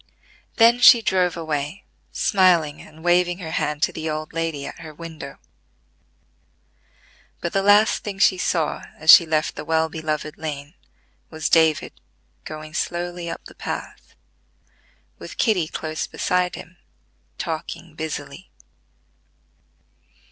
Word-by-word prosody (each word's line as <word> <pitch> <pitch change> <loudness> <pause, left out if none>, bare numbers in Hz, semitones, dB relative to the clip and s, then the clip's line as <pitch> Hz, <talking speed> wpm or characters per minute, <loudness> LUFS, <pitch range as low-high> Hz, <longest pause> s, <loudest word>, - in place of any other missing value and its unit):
Then 235 +1 +5
she 240 -1 +8
drove 180 -3 +1
away, 155 +2 -3 0.3
smiling 175 -6 +2
and 155 +1 -15
waving 175 0 +2
her 165 -4 -7
hand 150 -1 -1
to - - +1
the 160 0 -4
old 155 0 -4
lady 165 -4 -3
at - - -8
her 160 -2 -10
window; 160 -4 -9 2.0
but 170 - -4
the 195 - +2
last 205 +2 +4
thing 200 -2 -5
she 190 -1 +4
saw 165 -4 0 0.2
as 155 - +7
she 170 - +9
left 155 -1 0
the - - -6
well 160 0 +1
beloved 155 -1 -4
lane, 145 -1 -6 0.6
was 155 -1 -3
David 160 -2 +3 0.5
going 155 0 -8
slowly 175 0 -3
up - - -7
the - - -12
path, - - -7 1.0
with - - -10
Kitty 190 -9 +2
close 155 0 -4
beside 180 0 0
him, 175 0 -12 0.6
talking 165 -1 -5
busily. 160 -1 -6
160 Hz, 125 wpm, -22 LUFS, 155-180 Hz, 2.0 s, she